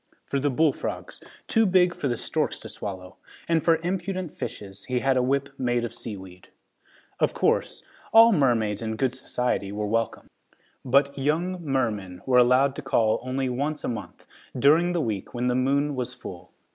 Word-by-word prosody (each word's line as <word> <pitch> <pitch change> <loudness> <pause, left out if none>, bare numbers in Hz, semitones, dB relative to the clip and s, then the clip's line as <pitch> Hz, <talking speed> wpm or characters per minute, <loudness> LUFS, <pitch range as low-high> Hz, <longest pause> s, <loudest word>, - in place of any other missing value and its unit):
For 140 - -1
the 145 +2 +1
bullfrogs, 145 +2 -1 0.3
too 225 -2 +3
big 180 -1 +4
for 145 - -3
the 120 -2 -1
storks - - -1
to - - -9
swallow, 95 -2 -7 0.3
and 165 -2 +2
for 165 - +5
impudent 185 -1 -3
fishes, 100 -1 -7
he 125 - -1
had 135 -1 +2
a 130 - +3
whip 140 +2 0
made 120 -2 0
of 120 - -6
seaweed. 95 -4 -9 0.7
Of - - +1
course, - - 0 0.3
all 230 +1 +8
the 195 - +2
mermaids 115 -6 +1
in 110 -1 -3
good 130 +1 0
society 125 -5 -2
were 105 +1 -3
welcome, 115 +2 -1 0.6
but 140 +2 +3
young 170 +6 -1
mermen 105 - -2
were 125 -1 +4
allowed 130 +3 +4
to - - -4
call 115 -5 +2
only 130 +1 -2
once 145 +5 -2
a - - -2
month, 115 -2 -6 0.3
during 160 +7 +4
the 170 - 0
week 110 -6 -4
when 120 +1 -1
the 125 - +2
moon 140 +3 +1
was 125 -1 -4
full. 90 -7 -10
130 Hz, 180 wpm, -25 LUFS, 115-150 Hz, 0.7 s, all